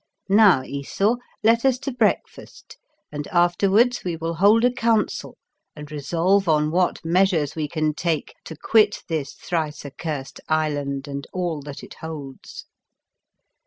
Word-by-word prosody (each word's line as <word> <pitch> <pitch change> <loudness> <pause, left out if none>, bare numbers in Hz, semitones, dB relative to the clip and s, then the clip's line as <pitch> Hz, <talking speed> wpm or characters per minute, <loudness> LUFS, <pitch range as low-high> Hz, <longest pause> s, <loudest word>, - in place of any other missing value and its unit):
Now, 195 -9 +6
Esau, 195 - -1 0.3
let 230 +1 +4
us 265 -2 +3
to 275 +2 -5
breakfast, 240 -4 -2 0.3
and 145 -1 -5
afterwards 195 +7 +2
we 175 -2 -2
will 165 +1 -3
hold 205 +7 +4
a 250 - +4
council 230 -3 0 0.4
and 150 -1 -10
resolve 170 +6 +1
on 150 -1 +2
what 180 0 0
measures 170 -4 +2
we 155 -2 -2
can 155 0 -1
take 160 -1 -2
to 160 - -8
quit 210 +5 +2
this 150 -4 -3
thrice 155 -4 -3
accurst 140 -1 -6
island, 145 -3 -1
and 140 -1 -6
all 175 -5 -2
that 140 0 -9
it - - -11
holds." 150 -4 -8
165 Hz, 140 wpm, -23 LUFS, 150-200 Hz, 0.4 s, Now